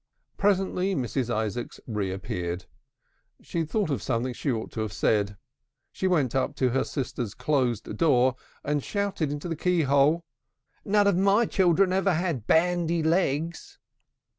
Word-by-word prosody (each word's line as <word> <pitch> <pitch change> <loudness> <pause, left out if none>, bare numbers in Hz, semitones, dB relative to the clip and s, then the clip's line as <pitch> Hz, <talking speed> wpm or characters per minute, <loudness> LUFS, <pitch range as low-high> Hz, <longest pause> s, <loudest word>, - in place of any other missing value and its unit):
Presently 195 -1 +1
Mrs. 125 -1 -2
Isaacs 110 +1 -3
reappeared. 95 -4 -3 0.8
She 170 - -4
had 160 -2 -2
thought 205 -6 0
of 130 -8 -1
something 125 +2 -1
she 135 +3 -2
ought 110 -2 -3
to - - -6
have 110 -2 -3
said. 100 0 +1 0.5
She 190 - -1
went 150 -10 +1
up 135 +2 0
to 130 -2 +1
her 135 +2 +1
sister's 125 -6 -4
closed 125 -4 0
door, 130 -5 +3 0.3
and 145 -1 -1
shouted 200 -7 -1
into 145 +3 -4
the 165 - -2
key 180 +1 +1
hole: 140 +4 +3 0.6
"None 205 0 +3
of 200 -3 +3
my 200 +4 +4
children 185 -1 +3
ever 190 -1 +2
had 160 - -2
bandy 170 0 +2
legs!" 165 -1 0
145 Hz, 150 wpm, -26 LUFS, 120-180 Hz, 0.8 s, my